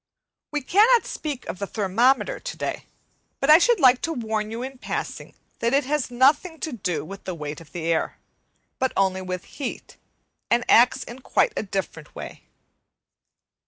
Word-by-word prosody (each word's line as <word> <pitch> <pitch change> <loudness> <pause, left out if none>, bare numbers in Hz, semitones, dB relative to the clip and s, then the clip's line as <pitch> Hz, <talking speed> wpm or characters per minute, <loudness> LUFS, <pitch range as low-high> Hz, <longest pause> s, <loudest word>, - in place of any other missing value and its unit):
We 295 -1 -2
cannot 440 - +5
speak 290 -5 -5
of - - -6
the 200 - -3
thermometer 235 - +1
today, - - -5 0.5
but 275 +2 +4
I 310 - +9
should 475 +2 +3
like 255 -4 +6
to 330 - -1
warn 220 -5 -2
you 230 +2 -5
in 265 0 -7
passing - - -5 0.2
that 235 +3 +1
it 285 - +3
has 290 -1 -1
nothing 295 +7 +2
to 315 - -3
do 180 - -3
with 195 +3 -10
the 185 - -4
weight 150 -1 -6
of 155 -4 -16
the 170 -2 -5
air, 165 -1 0 0.6
but 260 0 0
only 190 -1 +2
with 185 0 -4
heat, 275 -4 -7 0.5
and 240 +1 +2
acts 245 +2 +5
in 240 +2 -10
quite 425 - +1
a - - -1
different 190 -6 -5
way. - - -9
245 Hz, 170 wpm, -24 LUFS, 190-290 Hz, 0.6 s, I